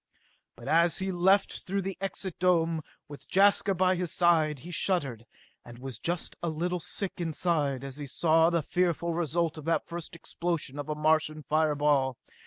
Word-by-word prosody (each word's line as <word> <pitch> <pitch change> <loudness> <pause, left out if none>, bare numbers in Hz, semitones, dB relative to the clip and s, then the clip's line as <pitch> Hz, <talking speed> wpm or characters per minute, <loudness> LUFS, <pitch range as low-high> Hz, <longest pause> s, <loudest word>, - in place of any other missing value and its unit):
But 120 +2 -12
as 165 +1 +3
he 190 0 -1
left 190 +3 +2
through 195 +1 -1
the 195 0 -4
Exit 195 -2 -4
Dome, 165 -3 +2 0.3
with 145 -1 -11
Jaska 200 0 +4
by 185 +1 +3
his 175 -2 -2
side, 160 -4 +3
he 175 - -9
shuddered, 140 - -1 0.4
and 120 0 -12
was 125 -3 -7
just 175 +4 -2
a 170 - -1
little 175 +3 -2
sick 190 +3 -3
inside 155 -5 0
as 135 0 -6
he 145 -1 -6
saw 160 +4 +3
the 170 -2 0
fearful 170 -1 0
result 165 -1 -1
of 150 - -11
that 165 0 +1
first 170 0 -6
explosion 165 -4 -4
of 145 - -5
a 150 - -1
Martian 155 0 +1
fire 155 0 +1
ball! 140 -3 +2
165 Hz, 180 wpm, -29 LUFS, 150-175 Hz, 0.4 s, Jaska